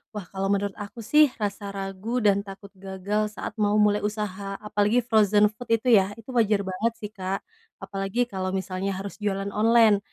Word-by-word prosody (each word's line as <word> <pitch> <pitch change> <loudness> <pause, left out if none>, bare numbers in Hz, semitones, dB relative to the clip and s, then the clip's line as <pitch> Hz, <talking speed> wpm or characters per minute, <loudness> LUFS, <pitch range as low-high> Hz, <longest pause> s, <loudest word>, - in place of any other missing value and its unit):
Wah, 205 - -4
kalau 195 0 -2
menurut 200 0 +1
aku 215 +3 -8
sih 300 +6 +6
rasa 205 -1 -3
ragu 195 +5 -3
dan 200 0 +2
takut 195 0 -10
gagal 200 +2 -2
saat - - -5
mau 205 0 +2
mulai 210 -1 +4
usaha, 205 -2 -3
apalagi 210 +3 +2
frozen 210 -2 +4
food 235 +3 -11
itu 230 -1 +5
ya, 195 +2 -2
itu 230 +3 -11
wajar 215 -4 +2
banget 195 +5 -1
sih 210 -2 -8
Kak. 195 -2 -4 0.4
Apalagi 195 +4 -1
kalau 190 -4 -3
misalnya 190 +1 -2
harus 195 +2 -7
jualan 200 -1 -2
online. 220 -1 +5
205 Hz, 180 wpm, -25 LUFS, 195-215 Hz, 0.4 s, sih